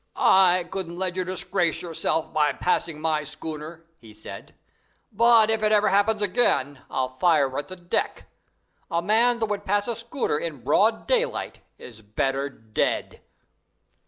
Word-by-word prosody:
"I 185 -2 +4
couldn't 175 -3 -5
let 185 -1 -2
you 185 - 0
disgrace 180 -2 -2
yourselves 165 -1 -1
by 150 -2 +1
passing 165 0 -1
my 155 -1 0
schooner," 155 +2 -7
he 110 -2 -15
said; 110 - -11 0.6
"but 225 0 +5
if 220 -1 +1
it 215 0 +2
ever 210 0 +4
happens 205 +2 +2
again 165 - +1
I'll 130 -1 -1
fire 135 0 +1
at 145 - -6
the 185 - -8
deck. 175 -1 -3 0.6
A 170 0 -1
man 230 +5 +3
that 230 - 0
would 205 -2 -3
pass 205 +2 0
a 235 - -2
schooner 235 - -2
in 150 -7 -6
broad 210 - +2
daylight - - -1 0.2
is 110 -3 -12
better 135 +6 -2
dead." 110 -5 -3
175 Hz, 155 wpm, -24 LUFS, 150-210 Hz, 0.6 s, but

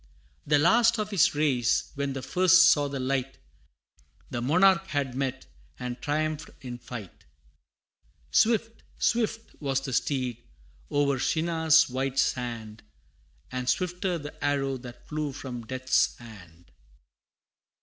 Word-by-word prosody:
The 145 0 +4
last 230 +9 +4
of 215 0 -3
his 185 -6 +3
race, 135 -6 +1
where 140 0 -2
the 135 -1 -4
first 185 +2 +6
saw 145 -1 +2
the 140 -1 -4
light, 135 0 -2 0.9
The 120 - -3
monarch 190 +8 +4
had 140 -4 -2
met, 135 0 -3 0.3
and 125 0 -6
triumphed 155 +1 -2
in 125 -2 -7
fight: 120 -5 -10 1.1
Swift, 225 - +2 0.2
swift 225 -1 -1
was 135 -2 0
the 135 -1 -5
steed, 125 -2 -1 0.5
o'er 140 -2 +1
Shinar's 160 +2 +3
wide 130 +1 -3
sand, 115 -5 -2 0.7
But 125 0 -2
swifter 180 0 -1
the 145 -1 -9
arrow 135 -2 0
that 120 -1 -12
flew 150 -2 -3
from 125 -5 -7
Death's 130 0 +1
hand! 90 -7 -14
140 Hz, 125 wpm, -27 LUFS, 125-160 Hz, 1.1 s, first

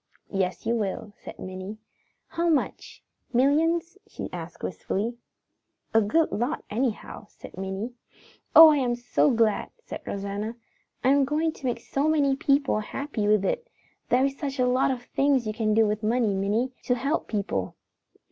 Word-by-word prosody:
"Yes, 185 -1 -1
you 230 - +1
will," 210 -1 -3
said - - -9
Minnie. 185 +3 -7 0.5
"How 335 +1 0
much; 300 -4 -1 0.3
millions?" 325 +8 +2 0.6
wistfully. 225 +5 -3 0.8
"A 225 - +6
good 310 +11 +2
lot 245 +8 -2
anyhow," 220 -2 -3
said - - -13
Minnie. 190 +5 -4 0.6
"Oh, 325 0 +12
I 300 - +4
am 245 -3 +1
so 245 +4 +2
glad!" 225 -4 +2
said 475 - -8
Rosanna. 200 +3 -4 0.5
"I 255 - +4
am 280 0 +5
going 305 +4 +1
to 280 - -11
make 240 -1 -1
so 275 +5 -1
many 285 -3 +3
people 275 -4 +2
happy 220 0 -3
with 210 -2 +3
it. 475 - -1 0.4
There 255 +2 +4
is 275 0 -3
such 280 -2 -3
a 250 - +3
lot 250 +2 +2
of 250 -2 -2
things 275 -1 +1
you 215 - -2
can 215 -1 0
do 225 0 +5
with 210 0 -1
money, 225 -1 +1
Minnie, 205 +6 0
to 250 - +2
help 275 +6 -1
people. 195 - -2
240 Hz, 160 wpm, -26 LUFS, 210-280 Hz, 0.8 s, Oh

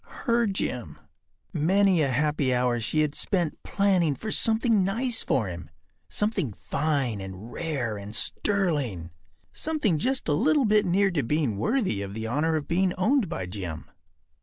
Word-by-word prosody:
Her 235 -2 +3
Jim. 195 -1 -3 0.6
Many 185 +2 +3
a 145 - +3
happy 140 -1 +1
hour 125 -1 +1
she 155 +7 0
had 150 -1 0
spent 175 -1 -1
planning 185 -7 +2
for 215 +7 -5
something 225 -2 +3
nice 230 +5 0
for 120 - +1
him. 85 -3 -7 0.4
Something 200 - -1
fine 140 -5 -1
and 95 +4 -8
rare 135 -10 -2
and 100 +2 -7
sterling—something 150 - -2
just 260 - 0
a 150 - +2
little 280 - +3
bit 210 -2 +3
near 195 +2 +3
to 160 -5 0
being 140 -3 0
worthy 185 - 0
of 100 0 -6
the 110 0 -4
honor 150 +7 0
of 150 -2 -2
being 180 +2 +1
owned 220 - +2
by 95 - -3
Jim. 90 -4 -6
155 Hz, 155 wpm, -26 LUFS, -, 0.6 s, Her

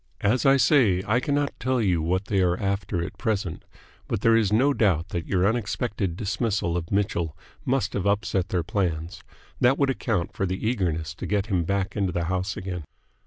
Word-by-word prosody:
As 125 +7 +2
I 135 0 +6
say, 115 - +4
I 115 +4 +2
cannot 145 +1 0
tell 130 0 0
you 90 -7 +2
what 90 +4 0
they 100 -2 +1
are 90 -1 +1
after 95 -3 -1
at - - -8
present, 100 -7 -2 0.4
but - - -2
there 115 0 +5
is 110 -3 +2
no 130 +7 +4
doubt 95 - +1
that 85 -4 -4
your 95 -1 +2
unexpected 105 -4 -1
dismissal 105 -4 -1
of 85 -1 -3
Mitchell 85 -6 0 0.3
must 130 -6 0
have 100 0 -1
upset 100 -2 0
their 90 -2 0
plans. 90 -2 -2 0.4
That 130 +3 +4
would 140 -2 +2
account 105 -6 -2
for 95 - -1
the 95 +4 -2
eagerness 85 - -1
to - - -6
get 100 -1 0
him 90 -3 +1
back 100 +1 -1
into 100 -3 0
the 85 0 -1
house 95 +3 -2
again." 90 -4 -5
100 Hz, 195 wpm, -25 LUFS, 90-110 Hz, 0.4 s, I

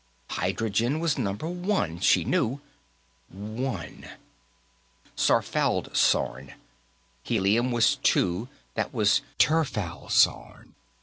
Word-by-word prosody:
Hydrogen 115 +7 -1
was 165 -4 0
Number 100 +10 -3
One, 175 - -2
she - - +3
knew; 130 +5 0 0.7
One, 105 - -6 1.1
Sarfaldsorn. 65 +3 +1 0.7
Helium 110 - +1
was 120 -2 +3
Two; 95 +8 +1 0.2
that - - -3
was - - +3 0.2
Tirfaldsorn. 130 - +1
115 Hz, 75 wpm, -26 LUFS, 95-140 Hz, 1.1 s, she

